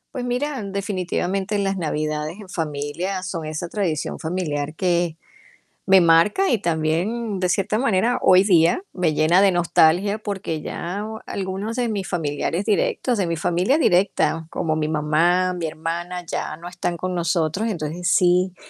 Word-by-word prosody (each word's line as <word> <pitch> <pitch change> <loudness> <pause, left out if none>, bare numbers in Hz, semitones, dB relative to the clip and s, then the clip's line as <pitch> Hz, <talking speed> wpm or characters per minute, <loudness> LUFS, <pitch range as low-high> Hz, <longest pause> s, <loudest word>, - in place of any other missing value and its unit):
Pues 250 - -3
mira, 255 +1 -2
definitivamente, 195 0 -2
las 195 -1 0
navidades 155 0 -2
en 195 - -12
familia 160 +4 -3
son 175 -4 -4
esa 155 +3 -4
tradición 180 -8 -2
familiar 155 -3 -3
que 175 -2 0 0.7
me 190 -1 +6
marca, 170 - +4
y 240 - +4
también, 185 +6 -1
de 180 - +1
cierta 200 +3 0
manera, 235 -1 +2
hoy 185 +1 +6
día, 175 - +4
me 175 -4 +1
llena 165 +5 +4
de 200 - +5
nostalgia, 175 +3 +3
porque 195 -7 -4
ya 190 +5 -4 0.2
algunos 195 +4 -4
de 245 -2 0
mis 200 -3 -3
familiares 165 +2 -2
directos, 225 +3 0
de 190 - +1
mi 170 0 -1
familia 180 - +1
directa, 180 - +2
como 155 -1 -1
mi 155 -1 -1
mamá, 165 +4 +2
mi 175 -2 -3
hermana, 170 +3 -4
ya 160 -2 -4
no 170 +2 -9
están 175 -1 -3
con 185 +1 -3
nosotros, 170 +4 0
entonces 170 -2 -2
sí 180 0 +3
180 Hz, 155 wpm, -22 LUFS, 160-195 Hz, 0.7 s, me